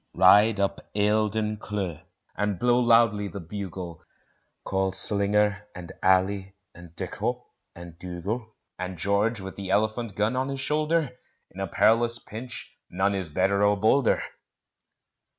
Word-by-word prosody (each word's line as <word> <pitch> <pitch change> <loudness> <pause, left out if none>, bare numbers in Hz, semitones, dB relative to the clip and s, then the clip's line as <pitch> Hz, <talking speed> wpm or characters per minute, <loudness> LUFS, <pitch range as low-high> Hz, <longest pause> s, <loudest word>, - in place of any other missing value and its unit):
Ride 105 +4 +6
up 100 0 -2
Eildon 105 +1 +1
Cleugh, 100 -7 -4 0.3
and 105 -1 -1
blow 120 +5 +3
loudly 115 -4 +4
the 100 - -7
bugle: 90 -2 -7 0.6
Call 95 -1 -1
Slinger 105 +1 +1
and 90 -1 -8
Allie 95 +1 +2 0.2
and 85 -1 -14
Dikkop - - -3 0.3
and 85 -1 -11
Dugal; 100 +6 -5 0.2
And 90 0 -5
George 100 +4 +1
with 95 0 -7
the 100 -2 -6
Elephant 110 +2 0
gun 105 +4 0
on 130 +1 -1
his 135 0 -4
shoulder 155 0 0 0.4
In - - -12
a - - -2
perilous 115 +1 +3
pinch 120 +2 -7
none 95 +3 0
is 95 -4 -3
better 95 +5 +1
or 105 0 +3
bolder. 110 +5 +3
100 Hz, 135 wpm, -26 LUFS, 95-110 Hz, 0.6 s, Ride